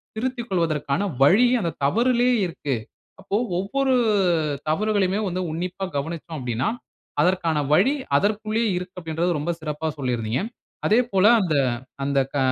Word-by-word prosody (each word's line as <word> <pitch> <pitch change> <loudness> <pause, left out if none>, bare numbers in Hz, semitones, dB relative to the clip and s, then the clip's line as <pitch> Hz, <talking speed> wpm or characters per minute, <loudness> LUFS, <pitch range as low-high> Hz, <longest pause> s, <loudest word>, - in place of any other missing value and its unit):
திருத்தி 250 +2 -2
கொள்வதற்கான 165 -2 0 0.2
வழி 210 - +6
அந்த 170 -2 -1
தவறிலேயே 245 - +3
இருக்கு. 150 -6 -3 0.5
அப்போ, 200 - -3 0.2
ஒவ்வொரு 265 +7 0 0.8
தவறுகளையுமே 200 +2 +1
வந்து 185 0 -2
உன்னிப்பா 180 +4 -3
கவனித்தோம் 160 +2 -5
அப்படினா, 125 0 -1 0.5
அதற்கான 175 -3 +1 0.2
வழி 200 - +4 0.2
அதற்குள்ளேயே 215 +5 0
இருக்கு 180 +1 -7
அப்படின்றது 165 +1 -1
ரொம்ப 160 +4 -1
சிறப்பா 155 +1 -3
சொல்லியிருந்தீங்க. 120 -2 -1 0.5
அதே 215 - +4
போல, 190 0 +3 0.2
அந்த 170 -5 0 0.5
அந்த 140 0 +1
க 145 - -1
180 Hz, 125 wpm, -23 LUFS, 150-210 Hz, 0.8 s, வழி